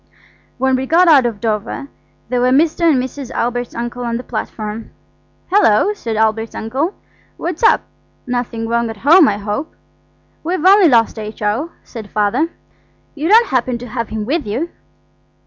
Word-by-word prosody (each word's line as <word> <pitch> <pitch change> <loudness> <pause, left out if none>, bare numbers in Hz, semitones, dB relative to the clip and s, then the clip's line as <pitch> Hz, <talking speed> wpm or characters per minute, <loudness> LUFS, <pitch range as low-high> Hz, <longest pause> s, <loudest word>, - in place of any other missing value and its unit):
When 265 +1 +2
we 265 +1 -3
got 350 +4 +4
out 280 -6 +6
at 220 -4 -5
Dover 220 +4 -2 0.4
there 250 -1 0
were 250 - +3
Mr. 320 +5 +3
and 280 - +2
Mrs. 260 0 -7
Albert's 245 0 -2
uncle 240 +1 -4
on 235 -1 -2
the 245 - -6
platform. 215 -1 -5 0.6
"Hullo," 385 - +4
said 230 - -5
Albert's 220 +1 0
uncle. 270 - -2 0.4
"What's 345 -1 -4
up? 450 - +5 0.4
Nothing 245 -2 -3
wrong 235 0 0
at 225 - -7
home, 325 +1 +7
I 200 - 0
hope." 210 +10 -4 0.7
"We've 350 +1 -2
only 390 -1 +7
lost 230 -4 +3
H.O.," 215 +7 -3
said 225 -4 -9
my - - -16
father. 215 +10 +1 0.6
"You 310 +3 -2
don't 455 +3 +6
happen 250 -1 0
to 245 +1 -9
have 230 -1 -4
him 215 -1 -4
with 290 +1 -1
you?" 260 +12 -3
245 Hz, 165 wpm, -17 LUFS, 225-310 Hz, 0.7 s, home